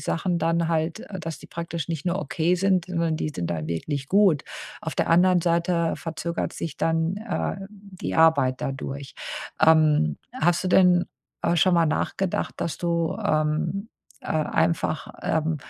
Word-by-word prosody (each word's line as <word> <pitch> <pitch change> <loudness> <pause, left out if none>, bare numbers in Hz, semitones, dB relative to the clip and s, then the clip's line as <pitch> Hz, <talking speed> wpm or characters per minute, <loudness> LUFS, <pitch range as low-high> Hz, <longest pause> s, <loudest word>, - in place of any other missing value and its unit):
Sachen 175 +1 -1
dann 165 0 +1
halt, 165 +4 -1
äh, 210 -6 -8
dass 160 -2 -5
die - - -13
praktisch 170 -1 -5
nicht 165 -2 -3
nur 175 +2 +1
okay 160 +4 0
sind, 185 -1 +2
sondern 165 -3 0
die 155 - -2
sind 85 - -2
dann 80 -3 -3
wirklich 135 - -3
gut. 195 -7 +4 0.4
Auf - - -4
der - - 0
anderen 180 +1 +5
Seite 170 0 +1
verzögert 170 +1 -4
sich 165 -3 -5
dann, 165 +3 0
äh, 205 -4 -3
die 200 -3 -7
Arbeit 140 -6 +4
dadurch. 135 0 -5 0.5
Ähm, 155 - +4 0.2
hast 170 +3 +2
du 185 - +1
denn, 180 -1 +5 0.4
äh, 170 0 +2
schon 180 +3 +4
mal 165 -1 +4
nachgedacht, 175 +4 -1
dass 160 - -2
du, 170 0 0
ähm 160 +5 0 0.3
äh, - - -10
einfach, 155 0 0
ähm, 160 0 0
165 Hz, 160 wpm, -25 LUFS, 155-180 Hz, 0.5 s, anderen